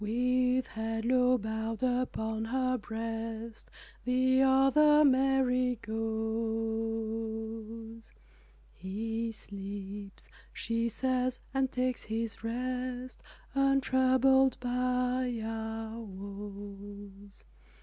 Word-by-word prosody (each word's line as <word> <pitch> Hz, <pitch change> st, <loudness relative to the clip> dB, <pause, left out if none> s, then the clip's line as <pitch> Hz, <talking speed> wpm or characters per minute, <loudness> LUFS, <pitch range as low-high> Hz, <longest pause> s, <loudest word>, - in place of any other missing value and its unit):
With 250 Hz, +3 st, +2 dB
head 225 Hz, 0 st, -3 dB
low 250 Hz, 0 st, +4 dB
bowed 220 Hz, +1 st, -3 dB
upon 225 Hz, -3 st, 0 dB
her 255 Hz, +2 st, +1 dB
breast 225 Hz, 0 st, -5 dB, 0.3 s
The 260 Hz, +1 st, +3 dB
other 270 Hz, +3 st, +6 dB
Mary 260 Hz, -2 st, +3 dB
goes, 225 Hz, 0 st, -3 dB, 0.6 s
"He 225 Hz, +5 st, -3 dB
sleeps," 200 Hz, -1 st, -8 dB, 0.2 s
she 230 Hz, 0 st, -1 dB
says, 255 Hz, +1 st, 0 dB, 0.2 s
"and 270 Hz, -1 st, +1 dB
takes 255 Hz, -1 st, -1 dB
His 225 Hz, 0 st, -3 dB
rest 250 Hz, +1 st, -3 dB, 0.3 s
Untroubled 265 Hz, -1 st, +4 dB
by 250 Hz, 0 st, 0 dB
our 225 Hz, 0 st, -4 dB
woes." 200 Hz, 0 st, -9 dB
230 Hz, 75 wpm, -31 LUFS, 220-255 Hz, 0.6 s, other